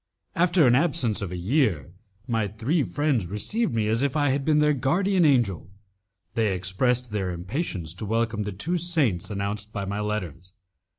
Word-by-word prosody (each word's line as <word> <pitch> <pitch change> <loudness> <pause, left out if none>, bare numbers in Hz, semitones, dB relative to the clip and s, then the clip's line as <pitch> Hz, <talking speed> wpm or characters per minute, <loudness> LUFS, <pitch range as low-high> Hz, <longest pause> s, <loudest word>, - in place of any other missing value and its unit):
After 175 -2 +4
an 120 - +5
absence 125 -7 +2
of 100 -3 -4
a 90 - -4
year, 95 - 0 0.4
my 115 -4 0
three 115 - 0
friends 140 - 0
received 115 - -1
me 110 -2 +1
as 110 +3 +1
if 140 +1 0
I 145 -2 +2
had 135 +1 -1
been 155 +1 +2
their 150 0 +4
guardian 175 +7 +2
angel. 115 - +2 0.6
They 110 -4 +1
expressed 115 +7 0
their 100 -3 -2
impatience 90 - -4
to 90 - -7
welcome 115 0 0
the 105 0 -3
two 165 - -2
saints 150 - +1
announced 105 +1 -3
by 100 -2 -4
my 100 +1 -3
letters. 95 -4 -4
115 Hz, 175 wpm, -25 LUFS, 100-145 Hz, 0.6 s, an